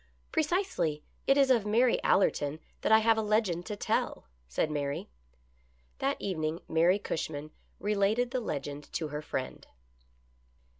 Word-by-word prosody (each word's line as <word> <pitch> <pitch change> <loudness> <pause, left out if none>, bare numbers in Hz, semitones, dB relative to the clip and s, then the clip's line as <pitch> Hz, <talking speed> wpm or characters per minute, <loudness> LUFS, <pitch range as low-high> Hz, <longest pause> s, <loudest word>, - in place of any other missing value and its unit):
" - - -37
Precisely. 305 - 0 0.2
It 275 - +5
is 275 -2 +5
of 235 -5 +4
Mary 230 +4 +3
Allerton 155 -5 +2 0.2
that - - 0
I 220 - +9
have 220 0 +3
a - - +2
legend 210 -5 +1
to 210 - -3
tell," 200 - -1 0.2
said 155 - -1
Mary. 145 - -2 0.9
That 275 +1 0
evening 160 -4 -2
Mary 170 +4 +4
Cushman 155 -6 -4 0.3
related 210 +4 +1
the 260 - 0
legend 145 - -5
to 160 -2 -2
her 150 +1 -4
friend. 130 -4 -5
195 Hz, 145 wpm, -30 LUFS, 155-225 Hz, 0.9 s, I